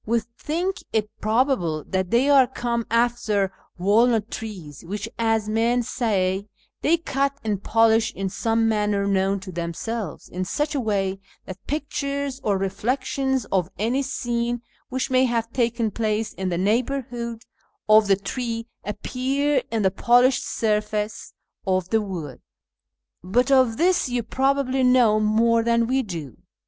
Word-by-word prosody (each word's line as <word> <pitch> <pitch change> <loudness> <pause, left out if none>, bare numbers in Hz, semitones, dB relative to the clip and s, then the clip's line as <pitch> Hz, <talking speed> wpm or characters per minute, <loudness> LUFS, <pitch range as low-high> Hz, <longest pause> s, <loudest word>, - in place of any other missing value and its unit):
We 235 +2 +1 0.2
think 350 +5 -2
it 215 -1 0
probable 215 - +1
that 190 -1 -2
they 240 +6 +3
are 275 -3 +6
come 235 -2 -2
after 230 -4 +1 0.2
walnut 215 +4 +3
trees, 180 -10 -7
which, 205 +4 -4
as 225 -2 +1
men 230 +3 +1
say, 200 -4 0 0.3
they 335 +3 +3
cut 275 -4 -1
and 205 -3 -2
polish 225 0 +3
in 195 0 -2
some 225 +4 0
manner 210 -2 +1
known 195 0 +1
to 190 -1 -8
themselves, 175 +3 -4
in 185 +1 -4
such 295 +10 -1
a 285 - 0
way 195 -4 -1 0.3
that 185 0 -10
pictures 280 -2 -3
or 205 -2 +1
reflections 260 +5 -1
of 185 -2 +1
any 240 +6 0
scene 240 -3 -2 0.3
which 260 +1 -2
may 255 0 +4
have 230 -2 -1
taken 235 -2 0
place 215 0 -1
in 190 -1 -3
the 175 - -1
neighbourhood 235 +3 -1 0.4
of 215 0 +6
the 195 - +5
tree 230 +3 -4 0.2
appear 265 +6 0
in 225 -2 -1
the 190 - +3
polished 245 +5 +3
surface 210 -1 -2 0.3
of 185 -1 +1
the 225 -1 +2
wood; 170 -10 -6 0.8
but 245 +9 +1
of 255 -4 +4
this 350 -3 +2
you 245 -1 -1
probably 270 +2 +1
know 250 -4 +5
more 225 +2 +3
than 235 0 +2
we 260 +3 +1
do. 165 - -7
225 Hz, 145 wpm, -23 LUFS, 200-255 Hz, 0.8 s, are